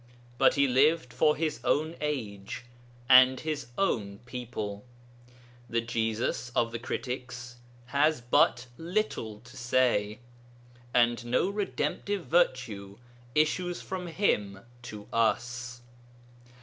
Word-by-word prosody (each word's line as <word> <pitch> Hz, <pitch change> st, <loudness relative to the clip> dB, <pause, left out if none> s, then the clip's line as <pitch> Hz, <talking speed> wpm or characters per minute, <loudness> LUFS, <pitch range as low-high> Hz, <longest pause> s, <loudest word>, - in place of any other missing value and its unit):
But -, -, +5 dB
he 140 Hz, -1 st, +4 dB
lived 135 Hz, +1 st, +3 dB
for 150 Hz, -1 st, +3 dB
his 155 Hz, -1 st, -2 dB
own 155 Hz, +3 st, +1 dB
age 115 Hz, -8 st, -4 dB, 0.4 s
and 130 Hz, 0 st, +7 dB
his 150 Hz, -5 st, -3 dB
own 105 Hz, -, 0 dB
people; 115 Hz, -5 st, -5 dB, 0.9 s
the 115 Hz, -, +1 dB
Jesus 115 Hz, +1 st, -1 dB
of 115 Hz, -, +2 dB
the 115 Hz, -, -4 dB
critics 125 Hz, -1 st, -5 dB, 0.3 s
has 145 Hz, +4 st, +2 dB
but 120 Hz, 0 st, +3 dB
little 165 Hz, -, -2 dB
to 120 Hz, +1 st, -15 dB
say, 120 Hz, -4 st, +1 dB, 0.7 s
and 120 Hz, 0 st, +3 dB
no 125 Hz, +10 st, +1 dB
redemptive 205 Hz, -1 st, -2 dB
virtue 125 Hz, -, 0 dB, 0.4 s
issues 175 Hz, +4 st, +1 dB
from 185 Hz, -2 st, -5 dB
him 105 Hz, -, 0 dB, 0.2 s
to 105 Hz, -4 st, -9 dB
us. 120 Hz, +1 st, 0 dB
125 Hz, 110 wpm, -29 LUFS, 115-150 Hz, 0.9 s, and